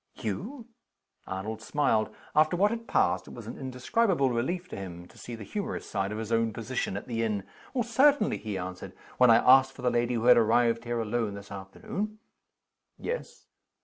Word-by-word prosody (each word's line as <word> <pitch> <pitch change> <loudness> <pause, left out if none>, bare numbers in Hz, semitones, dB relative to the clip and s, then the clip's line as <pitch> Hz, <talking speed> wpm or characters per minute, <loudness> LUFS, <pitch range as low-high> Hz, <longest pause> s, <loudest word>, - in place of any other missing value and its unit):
"You!" 210 - -5 0.6
Arnold 105 +4 -4
smiled. 115 -5 +1 0.3
After 155 +3 +4
what 205 +3 +4
had 230 0 -5
passed, 90 +1 +2
it - - -10
was 120 - -9
an 115 - -6
indescribable 135 - +1
relief 170 +10 -1
to - - -6
him 90 -2 -7
to - - -20
see 120 - -7
the 110 - -8
humorous 205 - -4
side 100 -1 -2
of 105 - -4
his 110 0 -5
own 115 -1 +2
position 115 -4 -3
at - - -7
the 115 -2 -2
inn. 105 -3 -1 0.4
"Certainly," 260 +1 +3
he 105 -3 -4
answered. 90 0 -6 0.3
"When 125 -1 +7
I 115 - +8
asked 130 +3 +6
for 130 - -11
the 125 - +3
lady 120 +1 +1
who 115 0 -1
had 125 - +8
arrived 115 +1 +3
here 120 0 -1
alone 110 -2 -1
this 100 0 -10
afternoon 100 - -5 0.4
" - - -56
"Yes." - - -5
120 Hz, 190 wpm, -28 LUFS, 105-150 Hz, 0.6 s, I